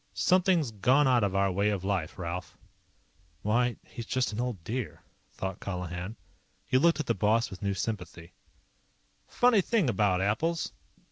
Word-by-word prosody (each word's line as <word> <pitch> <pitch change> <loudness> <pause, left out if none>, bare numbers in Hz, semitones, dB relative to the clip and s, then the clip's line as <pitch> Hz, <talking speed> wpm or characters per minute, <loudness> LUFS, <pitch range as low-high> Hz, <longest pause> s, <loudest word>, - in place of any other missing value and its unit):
"Something's 180 -7 +3
gone 130 +7 +3
out 125 -4 +4
of 100 -1 0
our 100 0 +2
way 100 +3 +1
of 100 -3 -2
life, 95 -4 -2
Ralph." 90 0 -5 0.9
Why, 120 +3 +2
he's 115 -1 -8
just 130 -4 0
an 105 - -4
old 120 -9 -3
dear, 120 +4 -4 0.3
thought 95 0 -5
Colihan. 90 +2 -5 0.5
He 130 - +3
looked 165 +2 +3
at 155 - -1
the 115 - +1
boss 110 +1 +1
with 95 - -9
new 100 -1 -1
sympathy. 90 -4 -5 0.9
"Funny 245 -4 +4
thing 190 - +1
about 100 -3 +2
apples. 135 - 0
105 Hz, 155 wpm, -29 LUFS, 95-130 Hz, 0.9 s, out